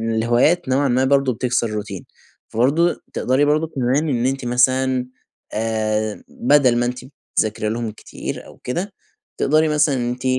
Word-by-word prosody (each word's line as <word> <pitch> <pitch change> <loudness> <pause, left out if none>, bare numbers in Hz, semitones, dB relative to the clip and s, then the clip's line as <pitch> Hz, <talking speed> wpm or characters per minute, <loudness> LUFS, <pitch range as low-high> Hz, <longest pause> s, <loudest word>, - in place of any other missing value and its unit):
الهوايات 120 +8 +2
نوعًا 135 +2 +2
ما 130 +1 +2
برضه 135 -1 +2
بتكسر 125 0 0
الروتين. 105 -3 -5 0.4
فبرضه 145 +9 +1
تقدري 130 +3 +2
برضه 155 +2 +2
كمان 140 +2 0
إن 120 -3 0
أنتِ 135 0 -1
مثلًا، 130 +1 +2 0.5
آآ، 110 -1 -1
بدل 150 - +3
ما 120 - +1
أنتِ 125 +1 -3 0.4
بتذاكري 110 0 0
لهم 115 0 -3
كتير 105 - -7
أو - - -15
كده، 180 +10 -3 0.4
تقدري 155 +3 +3
مثلًا 150 -2 +2
أنتِ 125 0 -3
125 Hz, 145 wpm, -20 LUFS, 115-145 Hz, 0.5 s, بدل